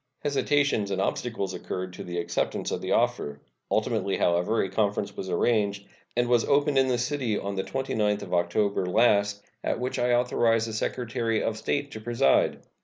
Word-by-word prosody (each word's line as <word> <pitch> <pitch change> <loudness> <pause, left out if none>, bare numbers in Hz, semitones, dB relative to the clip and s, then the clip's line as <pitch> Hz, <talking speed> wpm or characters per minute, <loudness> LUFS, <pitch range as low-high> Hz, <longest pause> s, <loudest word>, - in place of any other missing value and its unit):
Hesitations 145 -6 +1
and 95 -1 -1
obstacles 100 0 -2
occurred 95 0 -5
to - - -7
the 85 0 -5
acceptance 85 0 -2
of - - -2
the - - -3
offer. 70 0 0 0.3
Ultimately, 110 -3 0
however, 90 +6 +2
a 95 - -3
conference 100 0 0
was 95 - -5
arranged, 100 +1 +1 0.3
and 120 0 +2
was 120 -1 +3
opened 145 -1 +3
in 135 - +3
this 125 -1 +1
city 125 -6 -1
on 100 +1 -3
the 95 -1 -2
29th 110 -6 -1
of - - -7
October 90 +2 +1
last, 100 0 +3 0.2
at - - -1
which 125 +1 -2
I 120 0 +2
authorized 115 -2 +2
the 110 - -5
Secretary 115 0 -1
of 115 - -1
State 145 +5 -2
to 110 - -7
preside. 115 - +2
110 Hz, 180 wpm, -27 LUFS, 100-120 Hz, 0.3 s, was